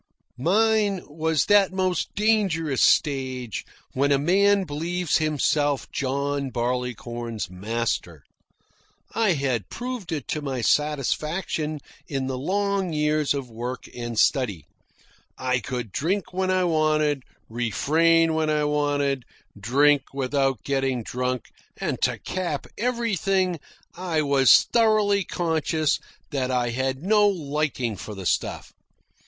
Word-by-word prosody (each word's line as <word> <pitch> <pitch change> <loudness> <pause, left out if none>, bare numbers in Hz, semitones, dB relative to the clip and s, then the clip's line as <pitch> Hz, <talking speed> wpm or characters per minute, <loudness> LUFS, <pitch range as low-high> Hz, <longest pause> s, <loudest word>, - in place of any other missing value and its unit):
Mine 205 - +2
was 160 -1 0
that 205 -2 +5
most 185 -2 -1
dangerous 190 - +1
stage 130 - +1 0.3
when 140 +2 +1
a 140 - +5
man 195 +6 +3
believes 170 +2 -1
himself 145 -2 0
John 140 +1 -1
Barleycorn's 120 -3 -3
master. 100 -5 -3 0.9
I 220 -5 +2
had 130 - -1
proved 245 -7 -5
it 155 -3 -3
to 155 - -2
my 135 -4 -3
satisfaction 150 +3 0 0.3
in 135 -2 -2
the 130 -1 -3
long 195 +3 0
years 150 -1 +1
of 130 -4 -5
work 120 +3 -5
and 120 -2 -5
study. 105 - +2 0.7
I 130 -1 0
could 125 -3 -5
drink 180 - -1
when 185 0 0
I 185 0 +2
wanted, 155 -4 +2 0.3
refrain 160 +8 +2
when 160 -1 0
I 150 -1 +1
wanted, 145 -2 0 0.3
drink 135 +7 +2
without 135 -3 0
getting 135 -3 0
drunk, 125 0 -3 0.3
and - - -3
to - - +1
cap 175 -6 -3
everything 195 -7 0 0.4
I 170 -4 -1
was 140 -2 +6
thoroughly 215 -3 +3
conscious 160 -3 0 0.3
that 130 -3 -1
I 125 -2 +1
had 130 +3 -2
no 210 +1 +4
liking 145 - -1
for 105 +2 -8
the 95 -1 -7
stuff. - - -1
145 Hz, 120 wpm, -24 LUFS, 130-180 Hz, 0.9 s, was